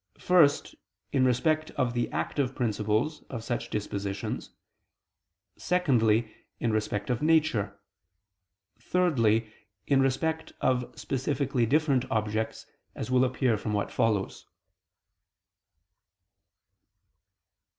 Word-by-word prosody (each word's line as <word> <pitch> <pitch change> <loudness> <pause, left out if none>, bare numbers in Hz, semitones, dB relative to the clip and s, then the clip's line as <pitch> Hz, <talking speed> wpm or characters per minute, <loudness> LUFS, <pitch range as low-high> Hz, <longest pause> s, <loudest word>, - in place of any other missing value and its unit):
First, 165 -6 +3 0.4
in 130 -1 +3
respect 155 +5 +1
of 125 -3 +1
the 120 0 -1
active 135 -3 -1
principles 110 +5 0
of 115 -4 -5
such 120 0 -3
dispositions; 100 -1 -4 1.1
secondly, 115 -11 +2 0.3
in 115 - 0
respect 105 +1 -1
of 120 - -1
nature; 150 -11 +2 1.0
thirdly, 115 -9 +1 0.3
in 135 -2 +3
respect 160 +5 -1
of 125 -1 0
specifically 135 -2 -1
different 140 -2 +2
objects, 110 +1 -2 0.3
as 120 - -5
will 130 0 +4
appear 125 -3 +1
from 105 - -3
what 100 -1 -1
follows. 105 -4 -1
125 Hz, 95 wpm, -28 LUFS, 110-140 Hz, 1.1 s, will